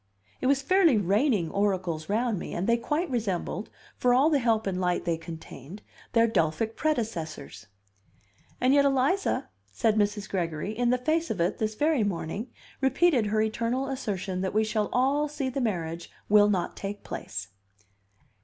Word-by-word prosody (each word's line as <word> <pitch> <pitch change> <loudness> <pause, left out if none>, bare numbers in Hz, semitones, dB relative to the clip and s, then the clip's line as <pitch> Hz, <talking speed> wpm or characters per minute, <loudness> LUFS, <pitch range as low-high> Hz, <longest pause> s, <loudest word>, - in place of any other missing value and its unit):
It 255 - +1
was 275 0 +2
fairly 345 - +4
raining 205 - +1
oracles 185 -6 -1
round 220 -1 0
me, - - -6
and 175 - -1
they 235 - +4
quite 295 +9 -1
resembled, 205 -3 -2 0.3
for 245 0 +3
all 285 +5 +4
the 290 - +3
help 225 -3 +1
and 185 -2 -2
light 180 -1 0
they 170 -1 +1
contained, 165 +2 -10 0.3
their 230 0 +5
Delphic 215 +1 0
predecessors. 170 - -3 0.9
"And 255 +2 +3
yet 285 0 +5
Eliza," 280 +8 +1 0.2
said 215 - +1
Mrs. 205 0 0
Gregory, 175 +2 -3
"in 240 +1 +1
the 250 - +3
face 320 +6 0
of 205 - -3
it, 175 +4 0
this 215 -1 -1
very 295 -2 +2
morning, 200 +3 -3 0.3
repeated 270 -3 +3
her 215 +1 +2
eternal 235 +5 -1
assertion 195 -8 -3
that 190 +1 -2
we 215 - +4
shall 215 -1 -1
all 275 +4 +2
see 285 -2 -3
the 265 +1 -3
marriage 170 -7 -3 0.2
will 205 0 +6
not 185 -4 -1
take 205 +1 -6
place." 100 -1 -6
215 Hz, 165 wpm, -27 LUFS, 185-260 Hz, 0.9 s, will